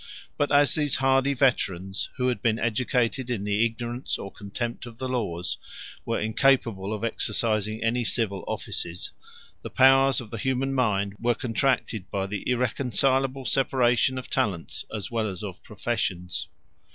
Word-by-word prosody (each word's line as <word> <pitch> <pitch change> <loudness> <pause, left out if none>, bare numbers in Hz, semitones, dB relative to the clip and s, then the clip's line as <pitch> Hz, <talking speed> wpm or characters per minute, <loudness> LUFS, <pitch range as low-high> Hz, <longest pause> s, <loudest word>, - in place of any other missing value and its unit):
141 145 - +2
But 145 - +6
as 145 - +2
these 150 -3 +1
hardy 135 +1 +3
veterans, 95 -8 +1
who 125 -1 +1
had 125 - -2
been 115 -2 +2
educated 120 +2 0
in 115 -5 -1
the 105 +2 +2
ignorance 120 +2 -2
or 100 - -7
contempt 120 +4 -5
of 115 -1 -11
the 130 - -3
laws, 95 -9 -2 0.5
were 115 - 0
incapable 110 -3 +2
of 110 0 -3
exercising 110 -1 0
any 120 +2 +1
civil 110 -4 -1
offices, 85 +1 -3 0.5
the - - -6
powers 135 0 +5
of 115 -3 -8
the 115 - -5
human 130 +3 0
mind 100 -6 +1
were 120 0 +2
contracted 115 -4 0
by 95 -1 -1
the 100 0 -4
irreconcilable 130 +2 +1
separation 130 -1 +2
of 130 - -5
talents 100 -11 -1
as 105 0 -4
well 115 -2 0
as 95 +1 -5
of 95 -3 -7
professions. 95 -4 -3
115 Hz, 155 wpm, -26 LUFS, 105-130 Hz, 0.5 s, But